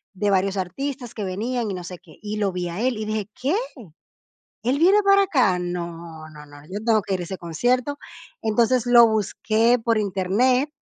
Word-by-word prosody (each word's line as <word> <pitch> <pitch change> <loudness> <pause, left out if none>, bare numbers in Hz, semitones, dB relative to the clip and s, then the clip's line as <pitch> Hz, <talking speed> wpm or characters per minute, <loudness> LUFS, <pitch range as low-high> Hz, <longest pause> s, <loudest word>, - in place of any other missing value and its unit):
de 205 +2 0
varios 195 +1 +1
artistas 250 +6 -4
que 210 - -5
venían 225 +5 -2
y 195 - -3
no 180 - -7
sé 180 0 -8
qué, 165 -4 -18
y 210 0 -5
lo 205 -2 0
vi 180 -1 -3
a 175 +5 -5
él 250 -1 0
y 215 - -4
dije: 215 -1 -3
"¿Qué? 280 +8 0 1.1
¿Él 255 +5 0
viene 375 +5 +5
para 395 0 +5
acá? 255 - +2
No, 170 -2 -6
no, 150 -1 -13
no, 145 0 -14
yo 190 +6 -6
tengo 220 -2 +3
que 195 - -3
ir 185 - -1
a - - -3
ese 190 +2 -6
concierto". 245 - -1 0.4
Entonces 235 +3 +1
lo 240 -1 +7
busqué 220 +2 +1
por 230 -2 +2
Internet 215 +8 +1
215 Hz, 200 wpm, -23 LUFS, 180-245 Hz, 1.1 s, lo